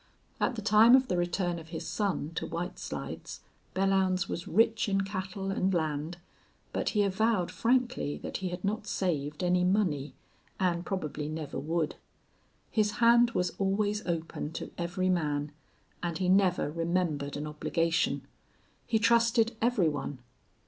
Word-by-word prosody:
At - - +1
the 215 - -5
time 220 +3 +7
of 260 -1 +3
the - - +1
return 175 0 0
of 160 - -11
his 160 0 -6
son 195 -7 -1
to - - -3
White 175 +3 -4
Slides 75 +2 -6 0.3
Belllounds 190 -1 +2
was 170 - -4
rich 220 +2 +3
in 195 0 +2
cattle 195 0 -4
and 190 0 +1
land, 160 -1 -1 0.6
but - - 0
he 205 - +5
avowed 200 -1 +1
frankly 240 - +1
that - - -5
he 190 -1 -3
had 180 0 -6
not 210 +1 -2
saved 150 -6 -1
any 180 0 +3
money, 180 -7 +1 0.4
and 175 -2 0
probably 155 -6 -3
never 155 -3 -4
would. 160 +2 -1 0.7
His 210 -2 +2
hand 235 0 +5
was 180 - +1
always 205 +2 +1
open 165 -3 -3
to - - -6
every 175 +2 -1
man 150 -4 0 0.5
and 170 -2 -2
he 180 0 0
never 185 -5 +3
remembered 165 -4 -1
an 145 - -4
obligation. 160 +2 0 0.6
He 225 - +2
trusted 230 +1 +3
every 230 -7 +3
one. 145 -2 -3
180 Hz, 150 wpm, -30 LUFS, 160-205 Hz, 0.7 s, time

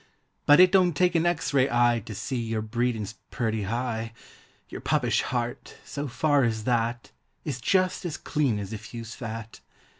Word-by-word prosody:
But 145 +2 +8
it 180 0 +8
don't 180 -4 +4
take 180 -1 +3
an 170 0 +2
X 165 -4 -1
ray 135 -1 +4
eye 120 -1 +3
To 110 - -6
see 125 +4 -3
your 110 -1 -2
breedin's 110 -2 -1 0.2
purty 110 -3 -1
high— 115 +1 -2 0.6
lour - - -6
puppish - - +1
heart, 120 -1 -3
so 145 0 -4
far 145 +2 +2
as 110 -2 0
that, 120 0 -1 0.3
Is 125 - -3
just 185 +7 +1
as 175 -4 -3
clean 140 -8 0
as 100 +1 -5
if 110 +2 -8
you's 115 -1 -6
fat. 115 -2 -7
120 Hz, 175 wpm, -26 LUFS, 115-145 Hz, 0.6 s, But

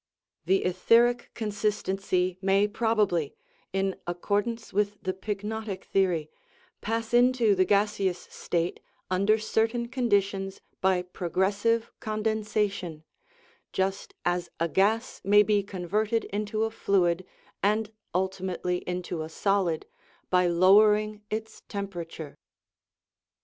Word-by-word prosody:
The 190 +2 +3
etheric 230 +7 +3
consistency 195 -4 -1
may 195 +1 +3
probably 210 - +1 0.4
(in 195 0 0
ac 175 - -3
cordance 220 +4 -1
with 205 +1 +1
the 185 - -1
pyknotic 210 +1 -4
theory) 175 -6 0 0.5
pass 225 +2 -2
into 245 -3 +5
the 185 -1 +3
gas 205 +2 +2
eous 185 -3 -1
state 170 0 -2 0.3
under 200 +4 +3
certain 225 +2 0
conditions 200 -6 0 0.2
by 185 -1 +2
progressive 200 +6 0
con 215 0 -3
densation, 210 -6 -1 0.7
just 190 +1 -2
as 175 -1 0
a 165 - +2
gas 205 +7 +1
may 205 +1 +6
be 210 0 +2
converted 205 +4 -1
into 210 +1 -1
a 225 - -1
fluid, 185 -5 +1 0.4
and 215 +2 +1 0.2
ultimately 185 -1 -1
into 180 -2 -3
a 155 - -5
solid, 185 -2 0 0.5
by 180 -1 +4
lowering 210 +4 +4
its 220 +1 -5
tempera 195 -4 -4
ture. 160 -3 -9
200 Hz, 115 wpm, -27 LUFS, 185-215 Hz, 0.7 s, may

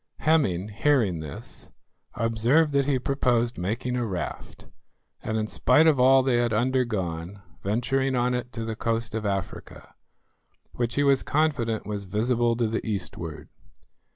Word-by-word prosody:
Hemming 130 - +2
hearing 110 - +1
this, 75 -2 -9 0.5
observed 115 +8 +2
that 140 -1 +1
he 140 -2 +2
proposed 125 -3 0
making 115 +7 -2
a 125 - 0
raft, 90 -7 -5 0.6
and 110 - -2
in 110 - 0
spite 125 +7 +3
of 155 -5 +4
all 130 +1 +6
they 130 -2 +2
had 120 -1 +1
undergone, 105 -7 -1 0.2
venturing 130 +6 0
on 125 0 +1
it 125 0 -3
to 115 -1 -4
the 110 0 -4
coast 115 0 -2
of 110 -2 -2
Africa, 95 -1 -5 0.8
which 120 -1 -3
he 145 - +2
was 140 -2 +4
confident 140 -8 0
was 105 -1 -4
visible 115 +4 +1
to 120 0 0
the 110 +1 -2
eastward. 85 -6 -5
115 Hz, 150 wpm, -26 LUFS, 105-130 Hz, 0.8 s, all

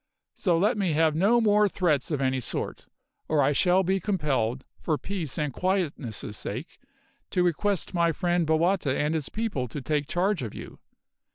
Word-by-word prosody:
So 175 -4 +1
let 210 +5 +2
me 185 -5 +1
have 160 0 +3
no 205 +8 +4
more 210 -2 +4
threats 155 -8 +1
of 150 -4 -1
any 130 -1 +1
sort, 120 - -3 0.4
or 150 -2 +2
I 135 - +3
shall 180 +5 +3
be 190 +2 +1
compelled, 140 - -1
for 155 -3 0
peace 175 -8 -4
and 150 -3 -1
quietness' 170 - -1
sake, 120 +9 -6 0.5
to 180 - +1
request 185 +3 0
my 170 -1 +3
friend 175 0 0
Bowata 160 -2 +2
and 150 +2 0
his 155 -4 -2
people 210 - -2
to 135 - -6
take 145 +1 -1
charge 185 0 0
of 115 -5 -5
you. - - -9
165 Hz, 175 wpm, -27 LUFS, 145-190 Hz, 0.5 s, no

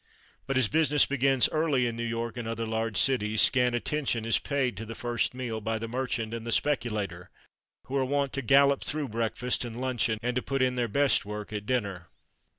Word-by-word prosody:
But, 135 -1 0
as 130 -4 +4
business 150 +1 +4
begins 135 -2 +3
early 155 -5 +1
in 120 -1 -2
New 115 - -4
York 115 0 -3
and 120 -2 -5
other 115 0 -3
large 110 -1 -2
cities, 110 -5 +2
scant 125 -2 +4
attention 120 -3 -1
is 115 - +3
paid 135 -5 -1
to 110 - -5
the 115 - -7
first 120 +1 -1
meal 120 -4 -4
by 110 +1 -1
the 115 +1 -5
merchant 120 -2 -3
and 115 -1 -5
the 115 - -4
speculator, 105 -10 -1 0.6
who 135 - -5
are 135 - +2
wont 140 +1 0
to 140 - -2
"gallop" 140 +2 +4
through 150 -2 -3
breakfast 115 +3 -1
and 120 0 -6
luncheon, 120 -4 0
and 125 0 -1
to 125 - +1
put 135 0 -1
in 130 -1 +2
their 120 -1 -1
"best 140 +5 +2
work" 105 +1 -7
at 105 -1 -5
dinner. 100 -9 -2
120 Hz, 210 wpm, -28 LUFS, 110-135 Hz, 0.6 s, as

